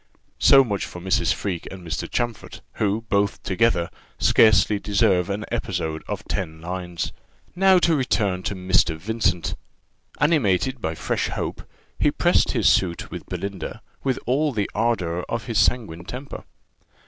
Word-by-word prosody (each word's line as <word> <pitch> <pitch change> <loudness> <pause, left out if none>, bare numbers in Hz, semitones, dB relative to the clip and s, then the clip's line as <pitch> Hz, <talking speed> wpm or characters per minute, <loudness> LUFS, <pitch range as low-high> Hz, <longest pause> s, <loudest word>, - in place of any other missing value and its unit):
So 135 -1 +7
much 100 -5 -2
for 90 - -9
Mrs. 95 +6 +1
Freke 90 -4 -3
and 95 -2 -9
Mr. 80 - -3
Champfort, 120 -3 -3 0.2
who, 105 +1 +1
both 100 -2 0
together, 95 -4 +2 0.3
scarcely 105 -1 +4
deserve 100 -3 +2
an 105 +2 -3
episode 80 0 -2
of - - -4
ten 80 -4 -3
lines. 90 0 -4 0.4
Now 190 +1 +5
to 170 -2 +3
return 105 -9 0
to 100 - -4
Mr. 90 -3 +2
Vincent. 100 -1 -1 0.7
Animated 130 - +2
by 80 -3 -2
fresh - - -1
hope, - - -4 0.4
he - - +4
pressed - - +2
his - - +2
suit 85 -2 +2
with - - -7
Belinda 100 -4 -5 0.2
with 130 -2 0
all 145 +4 +1
the 105 -3 -1
ardour 90 -7 0
of 115 -2 -3
his 115 -3 0
sanguine 85 -9 0
temper. 130 +7 -7
100 Hz, 150 wpm, -23 LUFS, 90-115 Hz, 0.7 s, So